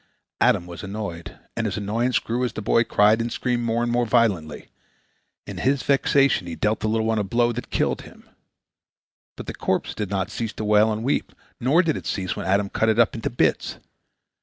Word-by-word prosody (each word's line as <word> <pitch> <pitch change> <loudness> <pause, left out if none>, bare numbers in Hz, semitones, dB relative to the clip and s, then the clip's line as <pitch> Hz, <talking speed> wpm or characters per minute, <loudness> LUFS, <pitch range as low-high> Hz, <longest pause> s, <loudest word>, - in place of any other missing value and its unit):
Adam 90 - +3
was 85 -1 -9
annoyed, 100 -4 -6 0.2
and 115 -1 -1
his 100 - -3
annoyance 115 +5 0
grew 120 +2 -2
as 120 -2 -1
the - - -5
boy 115 +2 +3
cried 110 0 +3
and 115 +1 -3
screamed 125 -1 -1
more 115 0 0
and 120 - -1
more 120 0 +2
violently. 100 -11 +1 0.8
In - - -7
his 135 +1 +1
vexation 140 -7 +2
he 85 - -5
dealt 105 +1 0
the - - -2
little 110 0 0
one 110 -1 +1
a - - +1
blow 120 +4 +1
that 120 +1 -6
killed - - 0
him. - - -15 1.1
But - - -7
the - - -5
corpse - - -1
did 105 -3 -4
not 95 -2 -2
cease 115 -2 -4
to 110 - -5
wail 105 +1 +4
and 110 +1 -3
weep, 135 - -1 0.3
nor 140 +8 +3
did 160 -3 0
it - - -7
cease 95 -3 -2
when - - -5
Adam 100 +1 +2
cut 110 +3 0
it 110 - +2
up 120 -2 +4
into 115 - -3
bits. 120 - 0
110 Hz, 210 wpm, -23 LUFS, 100-120 Hz, 1.1 s, wail